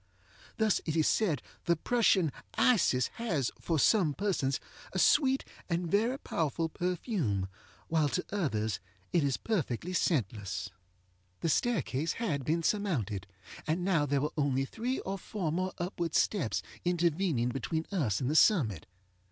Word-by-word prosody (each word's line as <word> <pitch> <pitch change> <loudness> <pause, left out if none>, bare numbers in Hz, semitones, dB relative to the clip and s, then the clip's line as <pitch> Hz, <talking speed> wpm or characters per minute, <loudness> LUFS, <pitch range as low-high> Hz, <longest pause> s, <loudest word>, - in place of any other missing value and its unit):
Thus 220 -3 +2
it 155 - 0
is 160 -2 +3
said 170 - +1 0.2
the 170 - +3
Prussian 190 - +3 0.2
Isis 170 - +3
has, 165 - 0
for 165 - 0
some 160 -2 +4
persons, 165 -10 0 0.3
a - - -2
sweet 270 - +4 0.2
and 170 -1 -1
very 225 +6 +2
powerful 165 - -1
perfume, 170 - -1 0.4
while 155 -3 +2
to 180 - -1
others 110 - -1 0.3
it 170 - +3
is 140 -2 +1
perfectly 180 - -2
scentless. 105 - -1 0.7
The 165 - +1
staircase 165 - +1
had 160 - -2
been 165 +5 0
surmounted, 130 - -1 0.4
and 170 +3 0
there 145 -7 +2
were 150 - -1
now 150 - +1
only 135 -1 +1
three 240 - -3
or 195 +1 -4
four 185 -5 -3
more 185 +3 -1
upward 175 -2 -3
steps 165 - +1 0.2
intervening 170 -7 +1
between 160 +6 -2
us 140 - +1
and 125 - -1
the 150 - 0
summit. 120 - +4
165 Hz, 145 wpm, -31 LUFS, 135-195 Hz, 0.7 s, some